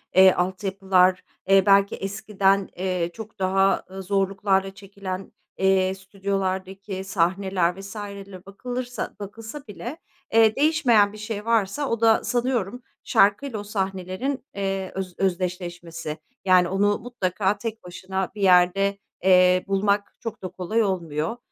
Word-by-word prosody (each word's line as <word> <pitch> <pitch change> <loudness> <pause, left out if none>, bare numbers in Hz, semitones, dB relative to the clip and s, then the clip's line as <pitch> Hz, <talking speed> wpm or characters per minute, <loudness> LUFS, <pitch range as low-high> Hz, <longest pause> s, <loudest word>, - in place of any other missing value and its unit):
eee, 190 0 +8
altyapılar, 185 0 +1 0.3
eee, 195 0 +6
belki 200 0 +4
eskiden, 195 -1 0
eee, 180 -2 -1
çok 220 -1 -10
daha, 195 +1 +2
ııı, 190 0 -7
zorluklarla 195 0 0
çekilen, 195 -1 -7 0.3
eee, 190 0 +3
stüdyolardaki 190 0 -4
sahneler 190 -1 0
vs. 200 +2 -9
ler 200 -2 -8
bakılırsa 245 +5 -5
bakılsa 225 +7 -8
bile, 240 +8 -7 0.4
eee, 225 -1 +5
değişmeyen 265 -9 +3
bir 215 - -10
şey 210 0 -5
varsa 230 +5 +1
o 230 -1 -1
da 225 -1 +4
sanıyorum 245 -2 -1 0.2
şarkıyla 215 +3 +2
o - - -6
sahnelerin, 195 +6 -3
eee, 195 -1 -2
öz 185 -2 -5
özdeşleşmesi. 175 -3 -3 0.3
Yani, 180 -1 +5
onu 205 +2 +1
mutlaka 205 -4 -1
tek 225 +1 -6
başına 185 +1 -4
bir 210 - -6
yerde, 195 +1 +4 0.3
eee, 185 -1 +5
bulmak 200 +1 0
çok 230 -2 -6
da - - -2
kolay 185 +5 -1
olmuyor, 170 +1 -2
195 Hz, 130 wpm, -24 LUFS, 185-210 Hz, 0.4 s, eee